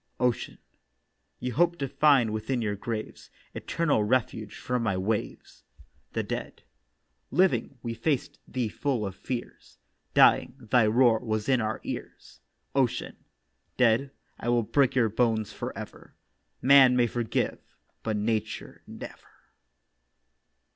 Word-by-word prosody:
OCEAN: 125 -2 0 0.8
'You 125 0 -3
hoped 170 +5 +2
to 140 - -2
find 135 -5 +3
within 120 +4 -2
your 105 -3 -1
graves 110 +1 -6 0.2
Eternal 150 -10 0
refuge 110 -2 -1
from 125 -1 -2
my 100 -5 0
waves.' 105 +3 -3 0.5
THE - - -1
DEAD: - - -6 0.7
'Living, 180 -6 +1
we 115 -1 -3
faced 130 +4 -2
thee 125 -3 -2
full 120 0 -1
of 95 - -4
fears; 120 +3 -7 0.4
Dying, - - +5
thy 115 0 +3
roar 115 0 +4
was 110 -3 -2
in 130 -3 +3
our 110 0 -2
ears.' - - -8 0.3
OCEAN: 135 -3 0 0.6
'Dead, 125 +3 +3 0.3
I 120 - -3
will 120 -1 +3
break 135 +4 +2
your 120 -3 +4
bones 110 -1 0
for - - -5
ever. - - -10 0.5
Man 130 -1 +7
may 120 -1 +4
forgive, 120 -1 -1 0.4
but 110 -1 -2
Nature 110 0 -3
never. - - -12
120 Hz, 125 wpm, -27 LUFS, 110-130 Hz, 0.8 s, Man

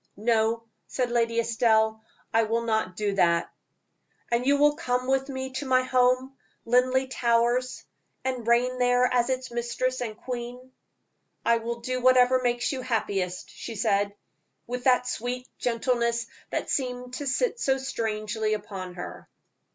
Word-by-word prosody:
"No," 225 +1 +1 0.2
said 250 -2 -1
Lady 230 -1 +1
Estelle, 220 -1 +2 0.3
"I 225 - +5
will 230 +1 0
not 220 -5 0
do 205 0 -1
that." 170 -3 +2 0.8
"And 240 +2 +1
you 285 0 +5
will 295 +1 +4
come 250 -4 -1
with 270 +1 +1
me 265 -1 -4
to 265 +2 -4
my 255 0 +4
home, 255 +1 +2 0.3
Linleigh 255 +2 +3
Towers, 245 0 +1 0.4
and 255 -3 -2
reign 250 +2 +2
there 245 0 +4
as 245 0 +2
its 260 -1 -2
mistress 240 +2 -2
and 220 -3 -4
queen?" 250 +1 -6 0.7
"I 235 0 +4
will 235 +1 -4
do 255 +1 -2
whatever 255 0 +5
makes 240 -1 0
you 265 -2 -3
happiest," 200 -7 -2
she 230 - -7
said, 200 -2 +1 0.5
with 250 0 -5
that 250 -1 +4
sweet 250 +1 -3
gentleness 235 -1 0 0.2
that - - -3
seemed 250 -2 -2
to 285 +2 -4
sit 485 - 0
so 265 -8 +2
strangely 220 -4 -2
upon 195 -4 -7
her. 180 - -8
245 Hz, 150 wpm, -27 LUFS, 225-255 Hz, 0.8 s, I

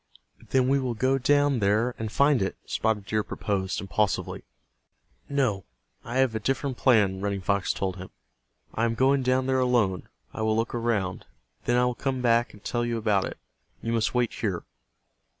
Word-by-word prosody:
"Then 130 -1 +3
we 140 +1 +3
will 125 -3 -2
go 130 +4 +1
down 145 0 +3
there 110 +4 +2
and 110 -2 -3
find 140 -2 +3
it," 95 - -1
Spotted 110 -3 -1
Deer 110 +1 0
proposed, 95 -3 -2
impulsively. 100 0 -1 0.9
"No, 125 -9 0 0.4
I 120 +2 -4
have 130 -3 +3
a 110 - -1
different 135 +3 -1
plan," 105 -7 +3
Running 100 -1 -1
Fox 100 0 +1
told 95 -1 -3
him. 95 0 -8 0.6
"I 115 - +1
am 115 0 0
going 135 +3 +3
down 130 0 +1
there 130 0 +1
alone. 120 -8 +1 0.2
I - - -5
will 110 0 +2
look 115 +1 -1
around. 115 -6 -1 0.4
Then 120 - +2
I 125 - +4
will 125 - 0
come 130 +1 -2
back 120 -1 +2
and 105 - -17
tell 120 0 -1
you 120 -1 -1
about 105 -3 +1
it. - - -6 0.5
You 115 - -1
must 115 +1 0
wait 120 -2 +1
here." 95 -6 -2
115 Hz, 185 wpm, -26 LUFS, 105-130 Hz, 0.9 s, I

